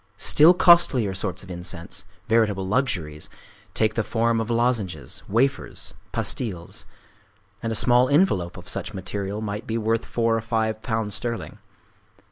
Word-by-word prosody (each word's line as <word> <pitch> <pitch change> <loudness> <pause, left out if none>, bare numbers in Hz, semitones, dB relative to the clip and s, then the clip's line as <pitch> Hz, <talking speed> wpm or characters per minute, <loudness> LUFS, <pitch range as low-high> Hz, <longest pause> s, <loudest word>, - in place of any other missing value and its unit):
Still 160 +4 +6
costlier 160 - +5
sorts 95 -1 -3
of 95 - -10
incense,—veritable 95 +4 -2
luxuries,—take 100 - -3
the 115 - 0
form 115 +1 +1
of 115 - -5
lozenges, 115 - -1
wafers, 130 +7 0 0.2
pastilles; 90 -9 -3 0.7
and 115 - -2
a - - -2
small 125 +3 +4
envelope 120 - +2
of - - -11
such - - -3
material 100 +2 -4
may 105 -1 -4
be 115 0 -3
worth 115 0 0
four 115 -1 +1
or 115 - -1
five 110 -1 -1
pounds 110 -2 -2
sterling. 115 +1 -4
110 Hz, 130 wpm, -24 LUFS, 95-120 Hz, 0.7 s, Still